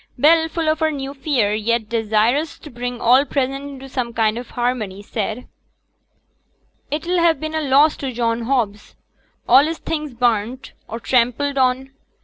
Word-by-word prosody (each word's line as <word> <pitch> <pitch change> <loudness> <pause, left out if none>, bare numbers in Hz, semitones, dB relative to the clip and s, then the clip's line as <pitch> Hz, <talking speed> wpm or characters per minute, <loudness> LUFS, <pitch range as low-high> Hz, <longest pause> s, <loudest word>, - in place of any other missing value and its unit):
Bell, 320 +4 +4
full 325 0 -2
of 310 0 +1
her 315 -1 +2
new 275 -2 -5
fear, 265 -7 0
yet 220 +1 0
desirous 230 +6 +1
to 300 - -12
bring 245 0 -5
all 250 +4 +5
present 275 -1 -2
into 270 -1 -9
some 250 -3 -3
kind 220 -1 +2
of 245 - -9
harmony, 225 -5 -2
said, 220 +3 -4 1.4
'It'll 340 +4 -1
ha' 335 -1 +3
been 310 0 -5
a 315 - 0
loss 290 +2 +4
to 270 -2 -4
John 230 -1 -1
Hobbs 225 -6 -2 0.5
all 275 - +7
his 325 +1 -3
things 300 -5 -4
burnt, 240 +2 -1
or 230 - -6
trampled 255 +4 +1
on. 260 +1 +1
255 Hz, 160 wpm, -20 LUFS, 230-290 Hz, 1.4 s, all